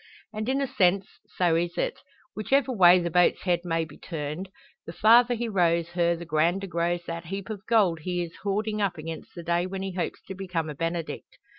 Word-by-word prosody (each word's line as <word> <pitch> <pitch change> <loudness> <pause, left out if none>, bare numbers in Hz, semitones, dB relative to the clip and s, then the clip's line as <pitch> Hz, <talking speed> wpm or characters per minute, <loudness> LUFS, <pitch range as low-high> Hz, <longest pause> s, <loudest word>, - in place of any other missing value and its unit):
And 215 +3 -3
in 270 +1 +1
a - - +1
sense 190 -3 +2 0.3
so 175 -3 +2
is 170 +1 -1
it, - - -1 0.4
whichever 260 +5 +1
way 185 -6 +7
the 170 -1 -1
boat's 180 +1 +3
head 175 -2 +2
may 165 -2 0
be 150 -2 -15
turned; 155 +3 -5 0.4
the 165 - -6
farther 235 +5 +5
he 235 +1 -2
rows 170 -5 +1
her 170 -1 +1
the 170 +1 -8
grander 170 +5 +1
grows 175 -1 -1
that 170 0 -5
heap 195 +4 -5
of 200 -2 -7
gold 200 -8 +3
he 175 +2 -2
is 165 -1 -9
hoarding 210 +2 -2
up 195 -4 0
against 160 +1 -8
the 170 - -7
day 175 +2 0
when 190 0 -5
he 195 - -3
hopes 180 -1 -4
to 190 - -7
become 180 -5 -3
a - - -6
Benedict. 165 +2 -4
175 Hz, 210 wpm, -26 LUFS, 170-200 Hz, 0.4 s, way